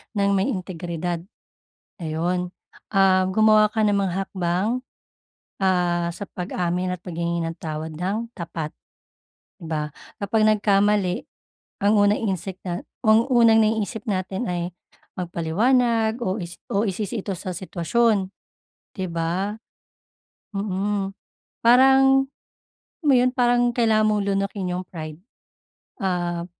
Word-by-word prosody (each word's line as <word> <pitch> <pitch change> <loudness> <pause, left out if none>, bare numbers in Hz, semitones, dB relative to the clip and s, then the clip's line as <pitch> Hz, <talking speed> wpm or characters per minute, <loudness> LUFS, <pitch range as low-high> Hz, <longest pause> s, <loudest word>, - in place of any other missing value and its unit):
ng 200 -1 +2
may 195 +4 +2
integridad. 175 - -3 0.8
Ayun, 175 +3 -1 0.5
um, 190 -1 +5
gumawa 215 +1 +5
ka 220 0 +1
ng 205 -1 +3
mga 195 -3 0
hakbang, 185 +6 -1 0.8
ah, 175 -2 +2
sa 185 - -7
pag-amin 180 0 -2
at 175 - -19
paghingi 170 -1 -2
ng 165 0 -3
tawad 155 0 -4
ng 205 +8 -3
tapat. 165 -3 -5 0.9
Di 170 - -10
ba, 150 -2 -2 0.3
kapag 215 +2 +1
nagkamali, 205 -3 +2 0.6
ang 205 +2 +4
unang 205 +1 +3
instinc 190 -3 -3
nat 175 -1 -4 0.2
ang 220 +2 +5
unang 230 -2 +6
naiisip 220 0 -1
natin 190 +2 -2
ay 175 0 -2 0.5
magpaliwanag 220 +7 +1
o 190 0 0
isi 175 0 -7
o 200 +3 +1
isisi 205 +3 -3
ito 200 - -2
sa 185 - -4
sitwasyon, 190 +3 +1 0.7
di 190 -2 -3
ba? 170 +5 -1 1.0
Mm, 195 0 -1 0.5
parang, 270 +2 +6 0.6
alam 355 - -50
mo 285 - +6
'yon, 250 0 +4
parang 245 0 +3
kailangan 220 -2 +3
mong 210 -1 +1
lunukin 195 -1 -1
yung 180 0 -4
pride, 155 -2 -7 0.8
ah, 175 -2 -1
195 Hz, 120 wpm, -23 LUFS, 175-215 Hz, 1.0 s, unang